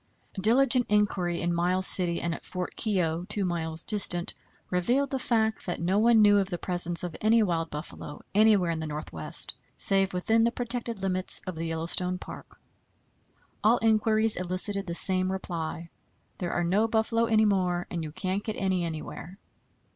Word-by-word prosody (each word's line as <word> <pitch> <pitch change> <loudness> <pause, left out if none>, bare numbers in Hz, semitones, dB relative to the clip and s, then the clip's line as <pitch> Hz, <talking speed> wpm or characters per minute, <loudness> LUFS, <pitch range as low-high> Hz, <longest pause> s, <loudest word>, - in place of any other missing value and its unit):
Diligent 245 +4 +2
inquiry 200 -4 0
in 175 0 0
Miles 180 +2 +1
City 175 -2 +5
and 170 -1 -2
at - - -8
Fort 180 -1 -5
Keogh, 175 -6 -1
2 200 -2 0
miles 165 -2 0
distant, 180 -5 +2 0.4
revealed 245 +10 0
the 265 - -2
fact 220 -4 -1
that 175 - -3
no 185 +5 0
one 225 -1 +5
knew 205 -1 +5
of 195 -1 -2
the 175 - -3
presence 175 -1 +3
of 175 -3 -5
any 225 +1 +4
wild 165 -4 -2
buffalo 150 -1 -8
anywhere 205 -4 +3
in 165 - -3
the 160 - -4
Northwest, 150 - -1 0.2
save 195 -1 +1
within 220 +5 +1
the 235 - +2
protected 235 -4 -4
limits 185 -1 +3
of 185 - -5
the 165 0 -5
Yellowstone 170 +3 0
Park. - - -11 1.0
All 225 +3 +4
inquiries 220 0 +2
elicited 185 +2 -2
the 170 - -4
same 185 +1 +1
reply: 170 -3 -5 0.5
"There 175 -2 -3
are 175 - -1
no 195 +6 +1
buffalo 225 +1 0
any 220 -1 +3
more, 180 -3 0
and 170 - -3
you 155 -1 -6
can't 190 +5 -3
get 215 - -4
any 190 -2 -1
anywhere." 165 +2 -7
185 Hz, 170 wpm, -27 LUFS, 175-215 Hz, 1.0 s, City